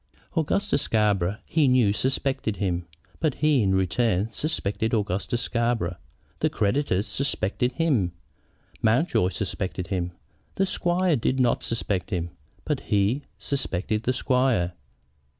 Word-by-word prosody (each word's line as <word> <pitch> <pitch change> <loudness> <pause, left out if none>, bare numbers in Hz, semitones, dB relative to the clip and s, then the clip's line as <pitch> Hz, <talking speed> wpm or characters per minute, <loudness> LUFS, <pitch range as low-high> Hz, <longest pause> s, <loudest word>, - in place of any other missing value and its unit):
Augustus 175 +1 +1
Scarborough, 105 -3 +1
he 155 -4 +2
knew, 125 -6 +4
suspected 130 -2 0
him. 90 -4 -2 0.3
But 155 -4 +1
he, 150 -4 +3
in 95 -2 +2
return, 100 +2 +1
suspected 110 -5 -1
Augustus 105 +4 -1
Scarborough. 115 -8 0 0.4
The - - +2
creditors 105 -2 +1
suspected 125 -2 0
him. 125 - +1 0.7
Mountjoy 115 - +3
suspected 95 -1 -3
him. 90 -2 -2 0.4
The 195 - +2
squire 180 -2 +1
did 130 +3 0
not 120 -2 +2
suspect 105 -5 -2
him, 85 -3 -2 0.3
but - - 0
he 105 +8 +1
suspected 105 -6 -2
the 125 +3 0
squire. 125 -9 +1
115 Hz, 120 wpm, -26 LUFS, 95-135 Hz, 0.7 s, knew